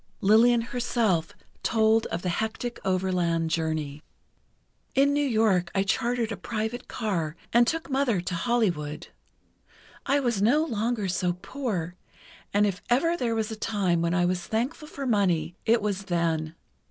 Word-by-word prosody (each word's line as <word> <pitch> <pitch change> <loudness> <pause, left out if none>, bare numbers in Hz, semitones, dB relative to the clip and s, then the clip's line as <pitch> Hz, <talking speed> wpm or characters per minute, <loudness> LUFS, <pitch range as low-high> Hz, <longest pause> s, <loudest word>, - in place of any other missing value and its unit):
Lillian 230 +4 +5
herself 230 -8 0 0.3
told 220 0 +3
of 170 - -4
the 180 - 0
hectic 220 +6 -3
overland 180 -3 0
journey: 155 -3 -2 0.9
"In 280 +1 +4
New 290 0 +2
York 215 -9 +2
I 195 - +3
chartered 230 +3 0
a - - -4
private 225 +2 -4
car 175 -9 -2 0.2
and 235 0 +5
took 325 +3 -1
Mother 265 -7 +1
to 180 +1 -4
Hollywood. 170 -7 -1 1.0
I 280 +1 +3
was 240 -7 0
no 285 +9 +4
longer 225 -4 -1
so 180 -1 0
poor, 195 -10 -3 0.6
and 205 +1 +3
if 195 -2 -2
ever 330 +8 +3
there 240 -7 -1
was 220 0 -1
a - - -3
time 195 -6 0
when 170 +1 +1
I 175 -1 +3
was 180 0 0
thankful 255 +8 -2
for 280 -2 -6
money 180 -8 +1
it 225 -1 +4
was 200 -2 -2
then. 165 -3 -1
210 Hz, 155 wpm, -27 LUFS, 175-240 Hz, 1.0 s, Lillian